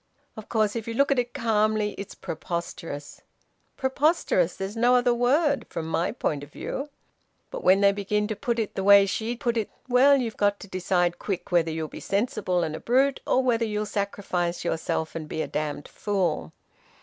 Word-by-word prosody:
Of 220 - -10
course, 215 -2 +1
if 230 -1 -4
you 230 - -3
look 280 +3 +3
at 275 - +3
it 245 0 -1
calmly, 215 -2 +1
it's 200 - -8
preposterous. 165 -3 -6 0.6
Preposterous 265 - +1
there's 195 +2 -5
no 240 +2 +4
other 245 0 +3
word 280 +5 +2
from 165 - -4
my 165 +2 0
point 150 - -2
of 145 - -12
view. 275 - -5 0.6
But - - -6
when 190 +2 +5
they 200 0 +6
begin 205 +1 -1
to 215 - -2
put 235 +3 -2
it 220 -3 -2
the 190 - -3
way 200 0 +8
she 220 +4 -2
put 235 -1 -1
it 220 - -1 0.2
well, 265 +3 +6
you've 235 -5 -3
got 205 0 +2
to - - -9
decide 180 -2 0
quick 195 -3 -4
whether 170 -2 +3
you'll 160 0 -3
be - - -9
sensible 200 -4 0
and 155 -1 -3
a - - -6
brute, 265 +3 +2
or 260 - +3
whether 240 -2 +2
you'll 210 -1 -1
sacrifice 190 -4 -2
yourself 160 -1 -2
and 155 -2 -6
be 160 - -2
a - - -5
damned 150 -1 -3
fool... 180 - -1
205 Hz, 195 wpm, -26 LUFS, 175-240 Hz, 0.6 s, way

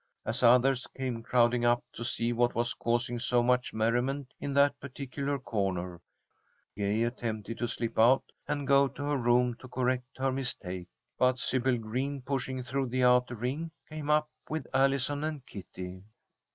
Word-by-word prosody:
As 115 +3 -1
others 125 +2 +5
came 130 -3 -2
crowding 120 0 +3
up 120 0 +3
to - - -6
see 120 0 0
what 120 +1 +2
was 120 +1 0
causing 120 +1 -1
so 120 0 +2
much 125 0 +2
merriment 120 +5 0
in 140 - -3
that 140 0 +4
particular 140 +1 -4
corner, 95 -8 -2 0.7
Gay 105 +2 +1
attempted 115 -2 -3
to 120 - 0
slip 115 -1 -3
out 125 +4 +6 0.2
and 145 -1 -1
go 140 0 +5
to 140 - -7
her 145 0 0
room 120 0 +3
to 130 - -11
correct 125 0 -1
her 135 0 +1
mistake. 95 -9 -3 0.3
But 130 0 +4
Sybil 130 0 +1
Green, 130 +5 -3
pushing 130 -1 -2
through 135 +2 -1
the 130 +1 0
outer 125 0 +4
ring, 130 +9 -3 0.2
came 155 -1 -6
up 150 0 +3 0.2
with 155 -4 -3
Allison 135 +2 +2
and 155 -4 -3
Kitty. 95 -1 -8
125 Hz, 165 wpm, -30 LUFS, 120-135 Hz, 0.7 s, out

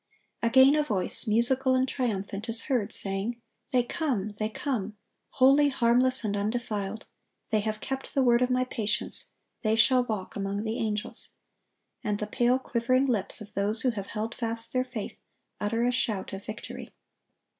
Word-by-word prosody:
(1092) 230 - +1
Again 265 +5 +6
a - - 0
voice, 210 -8 0
musical 255 +4 +4
and 255 0 +2
triumphant, 215 -4 -3
is 230 0 +7
heard, 240 -7 -1
saying: 200 +5 0 0.3
"They 250 -2 +3
come! 240 - -2
they 215 0 0
come! 215 -4 -3 0.4
holy, 275 +3 +5
harmless, 250 0 +3
and 205 -2 -1
undefiled. 210 -1 -3 0.5
They 215 - +3
have 215 0 -3
kept 270 0 -5
the 270 - +3
word 240 -1 +4
of 250 - +2
My 255 0 +2
patience; 220 -3 0 0.3
they 220 -1 +2
shall 250 +2 +4
walk 215 -6 -5
among 200 +1 -3
the 225 +1 -3
angels;" 210 -2 -1 0.7
and 210 -1 -1
the 210 - -3
pale, 245 +3 +2
quivering 255 +1 +1
lips 225 -4 0
of 215 0 -11
those 210 +3 0
who 255 - +3
have 200 -4 -6
held 220 +2 -4
fast 230 -1 -4
their 255 0 +1
faith, 240 -5 -7 0.4
utter 230 +3 0
a 245 - +2
shout 220 -7 -1
of 195 +1 -6
victory. 215 - -8
230 Hz, 170 wpm, -27 LUFS, 210-255 Hz, 0.7 s, is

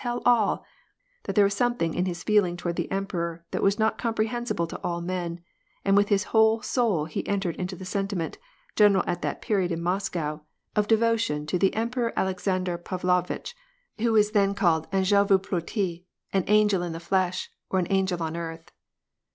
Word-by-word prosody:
tell 240 -1 -1
all; 235 -4 +3 0.6
that - - -3
there 205 -2 +6
was 200 - +1
something 200 -7 0
in 180 +1 0
his 175 -1 -4
feeling 200 -5 +2
toward 175 -1 -3
t - - -1
r^ - - -12
emperor 170 -4 -3
that - - -2
was 195 +1 +3
not 220 0 +1
comprehensible 230 -4 -1
to 165 - -8
all 170 0 -1
men, 175 -1 -3 0.5
and 195 0 +4
with 205 0 +4
^ 200 -1 +3
whole 220 +1 +4
soul 215 - +1
he 155 - -4
entered 195 -5 -1
into 185 +1 -4
the 185 - -9
sentiment, 195 -3 -3 0.4
general 205 -3 +5
at 175 - -2
that - - -3
pe 195 -6 +1
in 165 - -2
Moscow, 170 -4 -2 0.3
of 210 -1 +2
devotion 225 -9 +2
to 165 +4 -1
the 195 0 +2
Emperor 235 +1 -1
Alexander 185 -1 -1
Pavlovi 180 0 -1 0.6
who 230 +1 +2
was 210 -1 +4 0.2
called 165 -6 +1
then 195 -1 +2
an^el 200 +1 +4
vo 195 - +6
ploti, 180 -1 -3 0.3
an 190 -2 +1
angel 210 -3 +4
in 175 -2 -3
the 165 - -5
flesh, 185 +1 -1 0.2
or 185 -1 +1
angel 190 -3 +1
on 160 0 -3
earth. 165 -1 -6
190 Hz, 185 wpm, -26 LUFS, 175-210 Hz, 0.6 s, there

